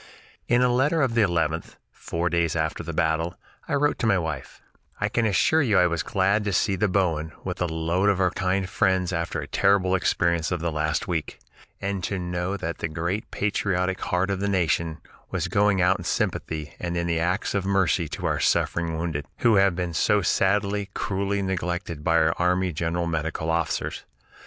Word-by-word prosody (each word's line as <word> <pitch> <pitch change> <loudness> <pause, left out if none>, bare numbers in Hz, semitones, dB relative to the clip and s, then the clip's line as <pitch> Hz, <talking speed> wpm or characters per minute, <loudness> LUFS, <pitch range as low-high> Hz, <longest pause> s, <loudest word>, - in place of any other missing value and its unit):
In 120 +1 +3
a - - +5
letter 150 +5 +2
of 130 -4 +1
the 115 - +3
11th, 85 -4 0 0.2
four 85 +1 -3
days 85 -1 +1
after 80 -1 -1
the 85 - -5
battle, 80 +2 0 0.3
I - - 0
wrote 145 +1 +1
to 115 - +1
my 100 -3 +4
wife: 80 -6 -5 0.4
"I - - 0
can 120 -2 +1
assure 155 +9 +3
you 110 -8 +2
I 90 - +6
was 85 -1 0
glad 100 +4 +1
to 100 - -1
see 100 +2 +2
the 105 +3 +1
Bowen 85 -5 0
with - - -5
a 90 - +2
load 85 +4 +1
of 100 -2 +1
our 90 -2 +3
kind 95 0 0
friends 95 -1 +1
after 85 0 -2
the - - -5
terrible 95 -2 +2
experience 85 -1 +1
of 90 - 0
the 85 +1 -1
last 75 -1 -1
week, 85 -4 -3 0.4
and 100 -2 -3
to 100 - -2
know 90 +2 -2
that 85 -2 -4
the - - -1
great 85 +6 -3
patriotic 95 -2 -1
heart 95 +2 0
of 95 - -1
the 100 +1 -1
Nation 85 -3 0 0.3
was 90 -2 -2
going 100 0 +2
out 90 +1 +3
in - - -6
sympathy 75 -2 -2
and 85 -1 -3
in 85 0 -1
acts 85 +4 0
of 100 -2 0
mercy 95 -3 +1
to - - -6
our - - 0
suffering 85 -1 +1
wounded, 80 -4 -3
who 115 -3 +5
have 95 -2 +4
been 90 -2 -3
so 105 +4 +2
sadly, 100 +2 +1
cruelly 100 +1 -1
neglected 90 -4 -3
by 85 +1 +3
our 80 0 +3
army 90 +1 +1
general 85 +2 -1
medical 80 0 -2
officers. 85 -1 -1
90 Hz, 195 wpm, -25 LUFS, 85-100 Hz, 0.4 s, I